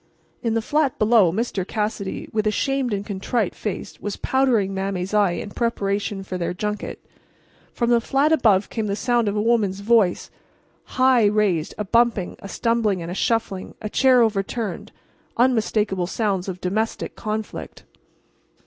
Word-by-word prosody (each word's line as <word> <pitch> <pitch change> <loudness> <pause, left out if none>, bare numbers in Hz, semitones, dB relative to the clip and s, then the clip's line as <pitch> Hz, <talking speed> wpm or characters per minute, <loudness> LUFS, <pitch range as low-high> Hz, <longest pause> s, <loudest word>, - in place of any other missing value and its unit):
In 230 -2 0
the 225 - 0
flat 290 0 +1
below 215 -5 +4
Mr. 210 -1 -2
Cassidy, 210 0 -3
with 215 -1 +1
a - - +5
shamed 270 +3 0
and 200 -1 -2
contrite 205 +1 -1
face 210 - -5
was 205 -1 -4
powdering 245 -7 +1
Mame's 190 0 -3
eye 205 -4 +3
in 205 - -5
preparation 200 -3 -1
for 185 -1 -5
their 175 +1 -2
junket. 210 +2 -4 0.7
From 235 0 0
the 235 -1 +4
flat 275 +5 +2
above 210 -9 +3
came 220 -2 -2
the 200 - -1
sound 240 0 +1
of 205 - 0
a 210 - +1
woman's 210 -4 +1
voice, 210 -4 +2 0.7
high 255 -3 +5
raised, 205 -6 +1
a 210 - -2
bumping, 230 -3 +2
a 195 - -9
stumbling 220 -6 0
and 170 - -6
a - - -3
shuffling, 195 -2 -1
a 215 - -5
chair 255 -2 +5
overturned—unmistakable 215 -1 -1
sounds 195 -2 -1
of 185 -1 -5
domestic 215 +5 -2
conflict. 215 0 -5
210 Hz, 155 wpm, -22 LUFS, 195-235 Hz, 0.7 s, a